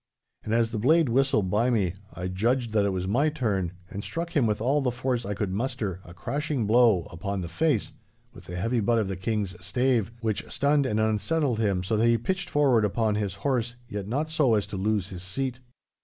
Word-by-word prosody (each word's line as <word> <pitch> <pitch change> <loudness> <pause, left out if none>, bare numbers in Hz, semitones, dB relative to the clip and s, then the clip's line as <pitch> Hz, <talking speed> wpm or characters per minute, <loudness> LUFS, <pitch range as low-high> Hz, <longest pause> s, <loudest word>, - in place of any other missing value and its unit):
And 110 - -4
as 115 0 +2
the 110 - -2
blade 155 +5 +4
whistled 125 -6 +2
by 115 +4 +2
me, 100 -8 +1 0.2
I 90 - -5
judged 115 +6 0
that 105 -2 +2
it - - +2
was 95 -1 -2
my 135 +10 +2
turn, 105 - -1
and 100 +2 -6
struck 170 +1 -4
him 135 -6 +4
with 105 -1 0
all 135 +6 +2
the 130 - +1
force 125 -2 -2
I 105 - -2
could 100 -2 -2
muster 100 -4 -2
a 85 - -13
crashing 140 - -2
blow 110 -4 +4
upon 100 +3 -3
the 85 - -4
face 145 - 0 0.4
with - - -13
the 90 - -7
heavy 115 +7 0
butt 115 +2 +2
of 110 -3 +1
the 95 - -2
King's 100 0 -2
stave, 120 +1 +1
which 110 -3 -1
stunned 145 -1 +2
and 110 -3 0
unsettled 110 - +1
him 100 -5 +1
so 105 +4 0
that 115 +2 +3
he 115 0 +4
pitched 185 - -2
forward 135 -7 +3
upon 105 +1 +1
his 100 -3 -2
horse, 120 -3 0
yet 100 -1 -5
not 140 +8 -1
so 150 -7 +3
as 105 - +1
to - - -7
lose 100 0 0
his 90 -2 -7
seat. 125 +7 -3
110 Hz, 220 wpm, -27 LUFS, 100-130 Hz, 0.4 s, blade